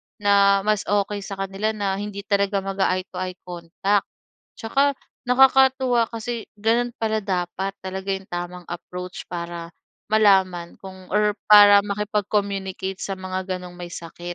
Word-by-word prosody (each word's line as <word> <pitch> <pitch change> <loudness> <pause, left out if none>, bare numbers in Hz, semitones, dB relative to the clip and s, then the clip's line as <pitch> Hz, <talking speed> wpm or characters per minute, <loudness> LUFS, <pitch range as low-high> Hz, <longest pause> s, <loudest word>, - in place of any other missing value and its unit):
na 200 -1 +4
mas 210 -1 0
okey 205 0 0
sa 200 0 -7
kanila 195 +3 -2
na 200 -2 -1
hindi 205 -1 -6
talaga 200 -1 0
mag-a-eye-to-eye 185 -1 -2
contact. 180 +3 -1 0.5
Tsaka 275 +4 +1 0.2
nakakatuwa 260 -2 +4
kasi 230 0 -5
ganun 230 +3 +1
pala 220 -1 -1
dapat 190 0 -2
talaga 190 +1 -5
yung 195 0 -3
tamang 175 0 -6
approach 180 +1 -7
para 170 -1 -6 0.4
malaman 190 -5 +3
kung 190 -1 -11
or 210 0 +2
para 205 -1 +9
makipag-communicate 200 -2 -2
sa 195 - -4
mga 185 0 -5
ganong 180 -1 -10
may 175 -1 -7
sakit. 175 +1 -7
195 Hz, 130 wpm, -23 LUFS, 185-210 Hz, 0.5 s, para